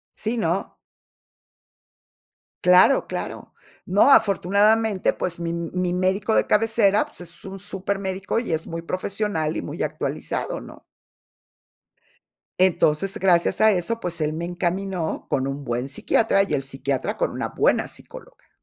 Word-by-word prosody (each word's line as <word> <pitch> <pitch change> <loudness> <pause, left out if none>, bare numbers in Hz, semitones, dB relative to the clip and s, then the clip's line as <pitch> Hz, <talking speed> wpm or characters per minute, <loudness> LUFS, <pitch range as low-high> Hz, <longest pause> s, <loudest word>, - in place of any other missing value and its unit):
Sí, 225 +3 -3
no. 175 -2 -1 1.9
Claro, 180 +9 +5
claro. - - -6 0.3
No, 205 +9 +4
afortunadamente, 210 0 +3
pues, 175 -1 -4
mi 170 0 -3
mi 175 +1 -2
médico 190 +4 +1
de - - +3
cabecera, 210 -2 +3
pues, - - -12
es 170 -1 -8
un 195 0 -7
supermédico, 195 0 -3
y 235 - -4
es 160 0 -2
muy 165 0 -5
profesional 185 -2 -2
y - - -2
muy 85 - -6
actualizado, - - -3
¿no? - - -12 1.8
Entonces, 185 +1 +2
gracias 180 0 +2
a 220 0 +7
eso, 200 +4 -1
pues, 175 -5 -4
él 155 0 0
me 165 +2 -4
encaminó 180 0 -3
con 135 -1 0
un 140 +1 -5
buen 120 0 -2
psiquiatra, 195 +8 +2
y 195 - -4
el 135 - -1
psiquiatra 135 0 -3
con - - 0
una - - -3
buena - - +1
psicóloga. - - -13
185 Hz, 140 wpm, -23 LUFS, 165-200 Hz, 1.9 s, a